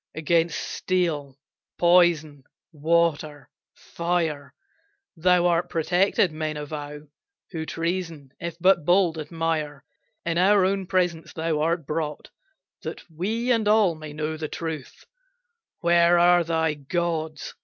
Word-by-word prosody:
Against 165 +1 +1
steel, 155 -7 -2 0.4
poison, 170 -5 +3 0.3
water, 155 -3 0 0.2
fire, 165 -4 -3 0.6
Thou 180 +1 +3
art 175 0 +1
protected, 180 +2 +2
men 155 -1 -4
avow 150 0 -6 0.5
Who 160 -3 -5
treason, 165 -5 -4
if 170 -2 -5
but 180 -1 +4
bold, 175 -1 +2
admire. 155 -2 -3 0.4
In 170 0 0
our 195 +1 +4
own 195 -1 -1
presence 175 -3 -1
thou 160 -1 -1
art 165 0 0
brought 150 0 -4 0.5
That - - -7
we 220 +10 -2
and 225 -3 +2
all 210 -4 +4
may 155 -1 -9
know 155 +1 -4
the 155 0 -4
truth 160 -4 -6 0.8
Where 170 0 +4
are 175 0 +5
thy 160 -1 0
gods? 155 0 -3
165 Hz, 120 wpm, -24 LUFS, 155-175 Hz, 0.8 s, are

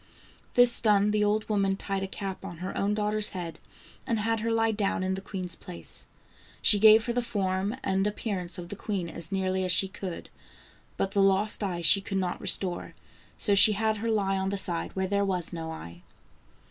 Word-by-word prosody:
Th 245 - +8
is 240 - +1
done, 210 -2 +3
the 210 0 +2
old 210 +1 +1
woman 195 -2 +1
tied 195 -1 -3
a 195 - -2
cap 195 0 -6
on 170 - -7
her 185 +3 -5
own 205 +1 0
daughter's 210 0 +1
head, 170 -3 -6 0.5
and 230 - +1
had 225 +1 0
her 230 +2 -2
lie 225 0 +2
down 205 -3 -1
in 190 0 0
the 190 - -4
queen's 185 -3 -5
place. 180 -3 -9 0.5
She 205 - +4
gave 220 +1 +7
her 235 - -1
the 245 - +1
form 200 -2 -1
and 195 +1 +1
appearance 195 -5 -3
of 175 -1 -7
the 205 - -5
queen 195 -4 -3
as 170 +2 -6
nearly 190 -1 0
as 185 - +1
she 190 +2 +4
could, 190 -2 -7 0.7
but 195 - -1
the 200 - +2
lost 195 +2 +2
eye 180 -3 -2
she 195 +4 +5
could 195 -1 -3
not 180 -2 -2
restore, 180 -3 0 0.4
so 205 - +2
she 205 +2 +7
had 220 +1 0
her 230 +2 -2
lie 195 -3 +1
on 190 0 -1
the 200 - -2
side 175 -3 -1
where 190 0 0
there 200 +1 +1
was 180 -4 -2
no 165 -1 -5
eye. 85 - -9
195 Hz, 210 wpm, -28 LUFS, 185-210 Hz, 0.7 s, Th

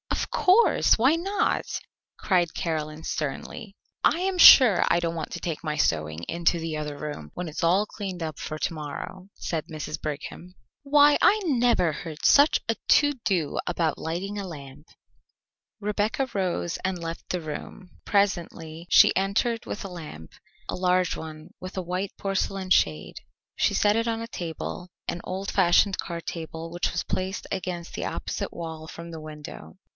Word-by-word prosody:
"Of - - -2
course! 395 +6 +4
Why 260 +7 +4
not?" 390 +5 0 0.5
cried 175 -4 +1
Caroline 155 -2 -3
sternly. 195 - -4 0.3
"I 340 - +3
am 375 -1 -1
sure 240 - +9
I - - +3
don't 170 -1 -2
want 160 -2 -5
to - - -4
take 165 -2 -4
my 155 -1 -2
sewing 80 - 0
into 170 - +1
the 160 -1 -3
other 150 -1 -4
room, 145 - -6
when 180 - -4
it - - -6
is 150 - -5
all 185 +5 +4
cleaned 190 -5 -6
up 155 -2 -5
for 155 - -5
to 160 - -2
morrow," 160 +5 -7
said 160 -3 -3
Mrs. 155 -1 -6
Brigham. 155 +4 -6 0.3
"Why, 290 +1 +6
I 430 - +5
never 245 - +2
heard 155 0 -7
such 285 +2 +6
a 225 - +1
to 290 +5 +3
do 170 -7 0
about 170 -3 0
lighting 190 +6 -3
a 195 - -5
lamp." 145 -2 -10 0.9
Rebecca 210 +5 -1
rose 180 -3 -1
and 190 -1 -1
left 165 -1 -7
the 180 - -1
room. 165 +4 -8
Presently 170 -4 -1
she - - +7
entered 210 +5 0
with 205 - -5
a - - -5
lamp 155 - -9 0.4
a - - -3
large 180 0 +2
one 155 +1 -9
with 185 +1 -8
a - - 0
white 180 +3 -3
porcelain 195 -1 -2
shade. 80 - +2 0.4
She - - +2
set 205 0 +3
it 230 +1 0
on 225 0 -1
a 230 - -5
table, 175 -2 -6 0.2
an 175 - -3
old 190 +1 -4
fashioned 190 +1 +3
card 170 -2 -5
table 165 0 -6
which 175 +1 -1
was 175 - -2
placed 190 +1 -3
against 180 -3 -4
the - - -3
opposite - - -4
wall 160 -2 -7
from 170 +1 -9
the 160 -1 -7
window. 150 - -10
175 Hz, 170 wpm, -26 LUFS, 160-200 Hz, 0.9 s, sure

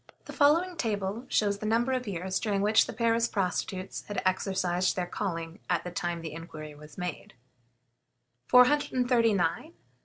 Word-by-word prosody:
The - - -9
following 335 +5 +3
table 210 -1 -2
shows 205 -4 +1
the 215 - -3
number 235 +4 +2
of 255 -2 -1
years 185 0 -2
during 200 -2 0
which 215 +1 +4
the - - -4
Paris 230 +1 +1
prostitutes 185 -1 -3
had 205 -2 -2
exercised 185 -1 +1
their 180 - -1
calling 170 -1 -4
at - - +1
the 180 - -6
time 170 0 -3
the 160 -2 -6
inquiry 155 -2 -8
was 150 +1 -14
made: 180 -9 -6 1.2
Time. 250 - +3
200 Hz, 150 wpm, -29 LUFS, 175-230 Hz, 1.2 s, which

